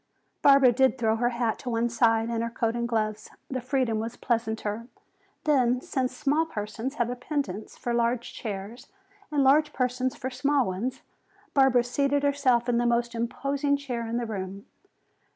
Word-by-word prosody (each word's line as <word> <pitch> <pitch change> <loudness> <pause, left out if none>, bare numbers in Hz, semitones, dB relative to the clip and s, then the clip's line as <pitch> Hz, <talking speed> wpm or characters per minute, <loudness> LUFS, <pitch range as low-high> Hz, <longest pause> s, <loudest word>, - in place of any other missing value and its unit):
Barbara 275 -3 +7
did 265 +2 +3
throw 225 -2 +1
her 240 +1 +2
hat 235 -2 -1
to 250 - -5
one 230 0 +1
side 225 -1 +2
and 230 -1 -1
her 230 - -1
coat 230 0 -1
and 235 0 -2
gloves. 215 -2 -1 0.2
The 260 -1 -2
freedom 250 -3 0
was 225 +1 -4
pleasanter. 225 -1 -2 0.6
Then, 255 -5 +3
since 255 0 -2
small 300 +2 +2
persons 225 +2 -5
have 240 -3 0
a - - -3
penchant 250 -6 -3
for 240 - -4
large 235 0 0
chairs 215 +4 -6 0.4
and 290 -2 +2
large 295 +3 +4
persons 255 0 -1
for 260 - -5
small 275 +1 +1
ones, 235 +8 -3 0.5
Barbara 265 -3 +5
seated 280 +3 0
herself 270 -4 +2
in 240 -1 +2
the 240 - +2
most 235 0 +1
imposing 275 +5 -1
chair 245 -5 -4
in 230 +1 -2
the 240 - -1
room. 195 -2 -5
240 Hz, 170 wpm, -27 LUFS, 230-265 Hz, 0.6 s, Barbara